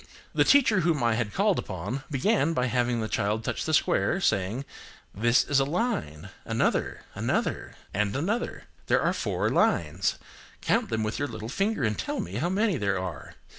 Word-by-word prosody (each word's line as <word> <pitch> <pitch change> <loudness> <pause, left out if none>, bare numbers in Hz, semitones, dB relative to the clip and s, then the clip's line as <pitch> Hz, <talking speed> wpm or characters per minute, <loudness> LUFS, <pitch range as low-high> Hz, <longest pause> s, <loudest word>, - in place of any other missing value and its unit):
The - - +4
teacher 240 -8 +5
whom 160 -6 +1
I 115 -1 +3
had 110 -2 -1
called 200 - +2
upon 100 +8 -4
began 165 - +2
by 125 -5 +1
having 120 -1 0
the 110 - -2
child 105 +1 -1
touch - - -2
the 160 - -1
square, 175 +3 +2
saying, 110 - 0 0.5
"This 120 +4 +3
is 140 -1 +2
a - - +4
line,–another,–another,–and 105 - -2
another. 205 - -2 0.2
There - - +3
are - - +2
four - - -1
lines: - - +1 0.4
count 225 -1 +1
them 110 0 -1
with 110 0 -2
your 145 - 0
little 110 -2 -7
finger 195 - 0
and 105 -3 0
tell - - -2
me 90 +4 -4
how 170 +8 0
many 200 -1 +1
there 100 -4 0
are. 90 -4 -6
125 Hz, 170 wpm, -27 LUFS, -, 0.5 s, teacher